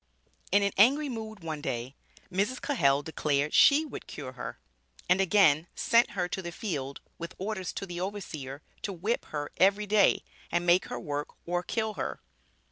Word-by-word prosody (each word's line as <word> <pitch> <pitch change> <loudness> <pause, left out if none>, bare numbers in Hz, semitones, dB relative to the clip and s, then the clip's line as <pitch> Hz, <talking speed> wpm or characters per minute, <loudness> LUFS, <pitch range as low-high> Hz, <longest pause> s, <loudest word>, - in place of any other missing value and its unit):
In 200 +2 +5
an 200 - +2
angry 280 +7 +5
mood 220 -4 -6
one 155 -2 -4
day, 125 0 -4 0.4
Mrs. 205 +8 0
Cahell 145 - +2
declared 150 -2 0
she 300 +2 +6
would 290 - -8
cure 135 -3 -7
her; 125 - -7 0.5
and 180 +2 +4
again 175 -5 +4
sent 235 +1 +3
her 180 -1 +1
to 190 - -3
the 175 -1 -5
field, 145 -8 -4 0.2
"with 170 0 -6
orders 190 -2 -3
to - - -4
the 175 -1 -5
overseer, 155 -8 -5 0.2
to 200 - -3
whip 200 +7 -1
her 145 -1 -4
every 200 +2 +4
day, 205 -1 +4 0.3
and 175 0 +1
make 175 +1 +4
her - - -5
work 145 -1 -4
or 175 +1 0
kill 220 +3 -2
her." - - -4
180 Hz, 175 wpm, -29 LUFS, 150-210 Hz, 0.5 s, she